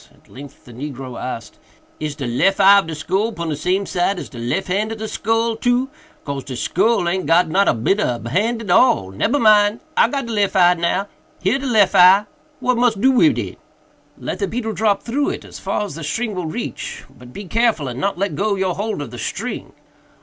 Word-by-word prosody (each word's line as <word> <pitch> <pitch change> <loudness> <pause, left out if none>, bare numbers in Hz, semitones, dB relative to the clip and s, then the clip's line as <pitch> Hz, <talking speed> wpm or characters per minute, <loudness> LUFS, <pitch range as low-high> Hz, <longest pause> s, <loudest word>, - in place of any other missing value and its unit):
At - - -28
length 140 +1 -13
the 120 - -13
negro 130 -1 -7
asked, 115 -4 -6 0.4
"Is 150 -1 -4
de 140 -3 -5
lef 160 - +1
eye 200 +1 +7
of 195 - -4
de 160 - -5
skull 200 +9 -1
pon 170 -3 -4
de 150 - -1
same 185 +6 -1
side 190 +1 0
as - - -7
de 120 - -10
lef 125 +11 -2
hand 205 +4 -1
of 225 - -5
de 220 0 -5
skull, 225 +2 0
too?—cause 245 - -3
de 130 - -7
skull 195 - +1
aint 185 +2 -1
got 170 0 +4
not 195 +5 +2
a - - +4
bit 155 - +1
ob 120 - -1
a - - -4
hand 225 - 0
at 200 - -3
all—nebber 205 - +2
mind! 215 -2 +4 0.2
I - - +5
got 275 +2 -3
de 230 - -5
lef 205 -2 0
eye 180 -1 +6
now—here 190 +5 -2
de 275 - -4
lef 215 -5 +3
eye! 185 +3 +7 0.3
what 250 -1 0
mus 240 -2 +3
do 260 +7 +3
wid 280 +4 +4
it?" - - -5 0.6
"Let - - -5
the 200 - 0
beetle 225 +2 -3
drop 205 0 +1
through 280 +5 -1
it, - - -6
as - - -10
far 210 - -2
as 200 - -7
the 165 +2 -8
string 220 +8 -2
will 180 -3 -4
reach—but 125 -4 -7
be 200 +9 -8
careful 220 - +1
and 125 0 -5
not 200 +6 -1
let 200 +2 -1
go 205 0 0
your 190 -2 -1
hold 205 -4 -3
of 125 - -10
the 120 - -8
string." - - -5
195 Hz, 225 wpm, -19 LUFS, 155-225 Hz, 0.6 s, eye